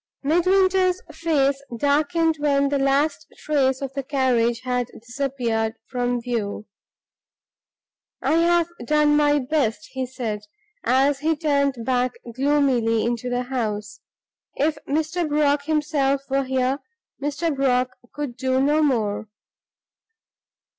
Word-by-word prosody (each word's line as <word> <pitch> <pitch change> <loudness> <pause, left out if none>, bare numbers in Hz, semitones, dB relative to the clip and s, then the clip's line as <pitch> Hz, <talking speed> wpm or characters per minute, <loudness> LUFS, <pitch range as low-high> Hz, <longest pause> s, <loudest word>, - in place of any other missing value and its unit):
Midwinter's 370 +3 +3
face 290 -4 +1 0.2
darkened 310 +4 +2
when 280 -1 +2
the 285 0 0
last 285 +3 +1
trace 270 -3 +1
of 270 -1 -5
the 275 - -2
carriage 250 -4 +1
had 250 -1 -1
disappeared 235 -2 -2
from 245 -1 -1
view. 225 -4 -3 1.5
"I 295 +5 +2
have 340 0 +3 0.2
done 300 +3 +3
my 295 0 +4
best," 285 +1 -1
he 260 -1 -3
said, 230 -4 -4 0.4
as 270 +2 +3
he 320 +2 +1
turned 280 -5 0
back 250 -1 +1 0.2
gloomily 260 -5 +2
into 240 +1 -2
the 245 0 -1
house 215 -4 -3 0.6
"If 295 +1 0
Mr. 315 +3 0
Brock 290 -1 +2
himself 295 -3 +1
were 275 0 +1
here, 260 +1 0 0.4
Mr. 295 +2 -1
Brock 255 -2 +1 0.2
could 290 -4 -5
do 260 0 +1
no 295 +3 +3
more!" 220 -7 0
275 Hz, 120 wpm, -23 LUFS, 250-300 Hz, 1.5 s, my